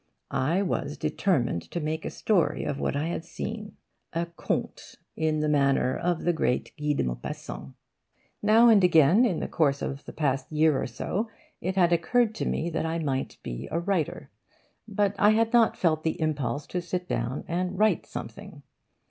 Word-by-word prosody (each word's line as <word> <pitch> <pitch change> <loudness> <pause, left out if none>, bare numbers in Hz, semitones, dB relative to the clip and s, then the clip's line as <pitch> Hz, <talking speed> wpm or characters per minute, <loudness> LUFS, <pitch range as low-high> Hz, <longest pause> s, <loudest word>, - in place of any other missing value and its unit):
I 145 +8 +1
was 145 -6 -2
determined 125 - 0
to 175 - -3
make 155 0 -3
a - - -1
story 195 -7 +1
of 140 - -3
what - - -1
I 150 +3 -1
had 165 - -3
seen 210 +6 -6 0.4
a 170 +1 0
conte 170 -1 -4 0.2
in 155 -1 0
the 155 - +1
manner 140 -3 +2
of 175 -1 -1
great 135 -6 -1
Guy 150 -1 0
de - - 0
Maupassant. 65 +1 -6 0.7
Now 220 +3 +6
and 215 -4 +6
again, 175 - +6
in 185 -9 0
the - - -2
course 140 -4 +1
of 140 +1 -4
the - - -7
past 135 -3 -1
year 155 -2 +3
or - - -2
so, 195 - -3 0.3
it 185 +2 -2
had 175 -2 +4
occurred 220 +7 +2
to - - -3
me 170 +2 -1
that 160 - -1
I 165 +1 -1
might 140 -5 -2
be - - -5
a 165 - -1
writer. 175 -3 -2 0.6
But 205 -1 +1
I 210 +1 +6
had 225 +1 +1
not 235 -2 +4
felt 155 -3 +1
the 160 - -1
impulse 145 -4 -1
to 180 - -2
sit 180 +1 -4
down 120 +4 -2
and 180 +2 -2
write 215 +2 +2
something. - - -8
165 Hz, 180 wpm, -27 LUFS, 145-190 Hz, 0.7 s, Now